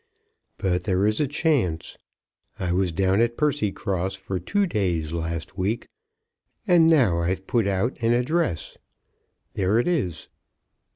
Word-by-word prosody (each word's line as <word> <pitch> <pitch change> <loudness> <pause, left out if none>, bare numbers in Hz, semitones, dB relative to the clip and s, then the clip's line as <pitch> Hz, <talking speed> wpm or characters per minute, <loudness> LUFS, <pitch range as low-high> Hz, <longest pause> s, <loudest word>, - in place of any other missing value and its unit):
But 90 -3 -1
there 95 0 +2
is 110 +1 +1
a 150 - +2
chance. 135 - 0 0.6
I 90 -2 -2
was 90 0 +1
down 95 +5 +2
at 120 0 +1
Percycross 100 - -1
for 95 -1 -4
two 200 - 0
days 90 - -1
last 85 +2 -4
week, 105 +5 -1 0.8
and 170 -2 +5
now 125 - +4
I've 95 +2 -2
put 115 -2 +1
out 100 +6 -1
an 115 0 +2
address. 125 - 0 0.7
There 95 +3 +1
it 120 - +1
is." 130 - -1
100 Hz, 135 wpm, -24 LUFS, 90-125 Hz, 0.8 s, and